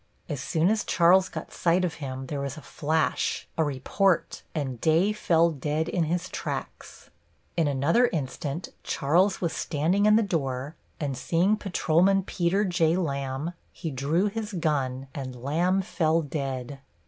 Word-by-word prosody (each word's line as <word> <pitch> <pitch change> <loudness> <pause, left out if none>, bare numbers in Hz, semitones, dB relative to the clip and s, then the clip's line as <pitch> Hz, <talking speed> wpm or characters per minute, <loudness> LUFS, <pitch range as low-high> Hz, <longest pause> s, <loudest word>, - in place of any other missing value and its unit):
As 145 -5 -4
soon 160 +4 +1
as 220 -1 +1
Charles 185 +2 +4
got - - -7
sight 175 +2 +2
of 170 - -2
him 130 -1 -5
there 145 +1 -4
was 140 0 -4
a - - -8
flash, 155 +1 -1
a 160 - +2
report, 155 +6 0
and 135 -6 -3
Day 170 +6 +3
fell 170 -5 +3
dead 150 +2 -2
in 175 -2 0
his 175 +3 -1
tracks. - - -6 0.4
In 165 -3 +2
another 145 - +3
instant 150 - -4
Charles 180 +8 +2
was 170 -3 0
standing 175 +7 +1
in 215 - +6
the 225 - +4
door, 140 -5 -2 0.2
and 140 -3 -2
seeing 175 +10 +2
Patrolman 190 -1 +2
Peter 185 +3 +1
J. 170 -3 +2
Lamb, 140 -1 -2 0.2
he 160 - -5
drew 145 +8 +1
his 215 +1 -3
gun, 135 -6 -1
and 130 -3 -5
Lamb 170 +10 +1
fell 165 -2 +1
dead. 135 -2 -4
160 Hz, 155 wpm, -27 LUFS, 140-180 Hz, 0.4 s, in